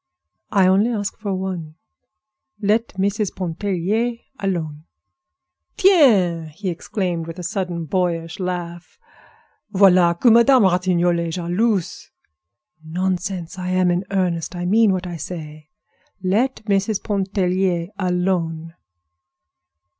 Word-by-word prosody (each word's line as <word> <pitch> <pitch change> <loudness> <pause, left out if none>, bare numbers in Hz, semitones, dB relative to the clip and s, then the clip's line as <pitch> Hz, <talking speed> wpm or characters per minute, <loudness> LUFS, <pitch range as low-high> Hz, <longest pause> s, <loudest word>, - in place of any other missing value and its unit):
"I 195 -2 +4
only 195 +5 +4
ask 205 -3 -3
for 200 -3 -2
one; 180 -5 -5 0.8
let 220 +2 +1
Mrs. 200 +1 -1
Pontellier 195 +6 -1 0.2
alone." 165 -6 -3 0.9
"Tiens!" 195 - +4
he 190 +2 -3
exclaimed, 175 -1 -3
with 165 +1 -7
a 180 - -6
sudden, 175 -2 -3
boyish 165 0 -2
laugh. 175 -2 -5 0.7
"Voilà 180 -4 +4
que 240 - +5
Madame 235 +2 +6
Ratignolle 175 -2 +2
est 165 - -4
jalouse!" 185 +2 -1 0.7
"Nonsense! 180 +1 -3
I'm 185 0 +1
in 175 +2 0
earnest; 180 -3 -1
I 175 0 -4
mean 215 +3 +4
what 185 -1 -2
I 175 -1 -5
say. 155 -3 -8 0.5
Let 220 +6 0
Mrs. 200 0 0
Pontellier 190 -3 0
alone." 180 -3 -1
185 Hz, 110 wpm, -21 LUFS, 170-200 Hz, 0.9 s, Madame